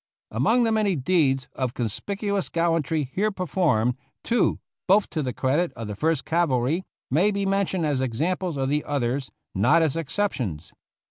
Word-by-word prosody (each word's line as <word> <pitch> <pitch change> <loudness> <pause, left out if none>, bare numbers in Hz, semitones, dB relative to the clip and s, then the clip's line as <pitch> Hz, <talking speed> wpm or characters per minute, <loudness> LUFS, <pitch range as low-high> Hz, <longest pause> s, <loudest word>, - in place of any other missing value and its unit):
Among 220 - +3
the 225 - +2
many 210 -4 +2
deeds 135 -3 +1
of 130 -2 -3
conspicuous 200 - -2
gallan 165 -1 +1
try 150 0 -1
here 210 +3 +1
performed, 150 - +1 0.3
two, 235 -2 +1 0.3
both 200 +2 +4
to 155 - -1
the 130 -3 -2
credit 145 +8 0
of 115 - -6
the 105 - -5
First 155 +4 0
Cavalry, 160 0 +1 0.3
may 170 +10 +4
be 200 -1 -1
mentioned 195 -3 0
as 145 -3 0
examples 160 +7 -1
of 135 -1 0
the 150 +1 +1
others, 135 -1 -1 0.2
not 125 - +4
as 155 -3 0
exceptions. 135 - -2
155 Hz, 160 wpm, -25 LUFS, 130-190 Hz, 0.3 s, both